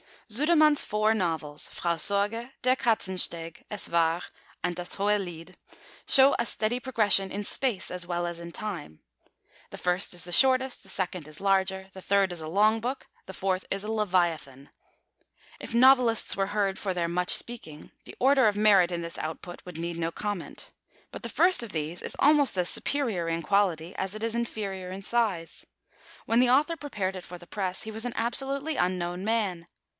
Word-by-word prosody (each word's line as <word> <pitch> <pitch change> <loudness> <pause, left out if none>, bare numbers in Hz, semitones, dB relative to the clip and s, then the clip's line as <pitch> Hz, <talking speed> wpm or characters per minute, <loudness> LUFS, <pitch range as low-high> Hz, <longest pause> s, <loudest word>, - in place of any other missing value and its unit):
Sudermann's 305 +4 +4
four 215 +1 +1
novels, 160 -7 -2
Frau 170 -1 -2
Sorge, 205 +8 +1
Der 255 +1 +3
Katzensteg, 185 -8 -1
Es 210 -2 -4
War, 165 0 +2 0.4
and 175 -1 -1
Das 175 0 +1
hohe 205 +1 +1
Lied, 175 -1 -8 0.5
show 270 +1 +7
a 235 - +1
steady 230 +2 0
progression 210 -6 +2
in 205 +2 -4
Space 220 -3 -1
as 180 -1 -5
well 175 0 -2
as 170 -1 -5
in 170 0 -8
Time. 175 - -6 0.7
The - - -8
first 180 +2 0
is 175 -1 -1
the 175 - -3
shortest; 260 +5 +4
the - - -13
second 180 -4 -2
is 155 +2 -8
larger; 190 -1 0
the 190 - -10
third 195 -1 +2
is 175 - -6
a 155 - -7
long 210 +6 +3
book; 250 +4 -5 0.2
the 190 - -9
fourth 190 0 -2
is 195 0 -3
a 215 - -4
leviathan. 170 -10 -1 0.9
If - - -6
novelists 250 -2 +5
were 195 0 0
heard 200 -2 -1
for 195 -2 -2
their 170 -1 -1
much 180 +1 -1
speaking, 160 -11 0
the - - -10
order 265 -2 +4
of 205 - +1
merit 200 -4 +5
in 170 -1 -3
this 170 0 -4
output 165 +3 -6
would 180 -3 -8
need 170 0 -4
no 165 0 -1
comment. 205 -1 -6 0.4
But - - -8
the - - -6
first 365 -4 +3
of 235 -4 -7
these 160 +2 -4
is - - -5
almost 285 -7 +4
as 180 -1 +2
superior 230 -12 -1
in 165 0 -2
quality 175 -1 +1
as 190 +2 -2
it 215 - -6
is 230 0 -1
inferior 200 -5 -4
in 190 +2 -7
size. 205 -7 -1 0.6
When 230 - +2
the 250 0 +4
author 300 +6 +3
prepared 200 -11 -4
it 180 - -9
for 180 - -9
the 175 - -14
press, 190 -1 -3
he 220 - -6
was 220 +2 -4
an 245 - -3
absolutely 275 +5 -2
unknown 180 +1 -1
man. 200 -7 -1
195 Hz, 190 wpm, -27 LUFS, 175-230 Hz, 0.9 s, show